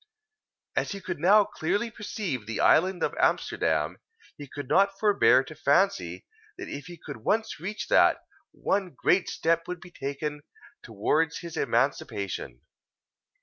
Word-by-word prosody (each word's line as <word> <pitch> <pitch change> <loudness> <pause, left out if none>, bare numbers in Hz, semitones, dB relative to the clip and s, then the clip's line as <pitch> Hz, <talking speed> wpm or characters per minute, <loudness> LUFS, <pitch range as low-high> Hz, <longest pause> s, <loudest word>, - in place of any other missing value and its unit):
As - - -1
he 200 - -6
could 180 - -5
now 200 +6 +6
clearly 205 +8 -2
perceive 190 - -4
the 115 - -4
island 185 +3 +3
of - - 0
Amsterdam, - - +1 0.4
he 145 - -10
could 145 0 -7
not 195 +5 +3
forbear 130 - +4
to 155 - -10
fancy, 180 +7 +1 0.3
that 370 - -7
if 145 +3 -7
he 175 -1 -10
could 145 -3 -8
once 220 - -1
reach 200 +6 -5
that, - - +5 0.3
one 195 -3 -2
great 185 0 +2
step 165 +1 0
would 180 -1 -5
be 175 0 -13
taken 145 0 -4 0.4
towards 155 +10 0
his 170 -2 -8
emancipation. 100 -2 -1
170 Hz, 145 wpm, -27 LUFS, 145-195 Hz, 0.4 s, now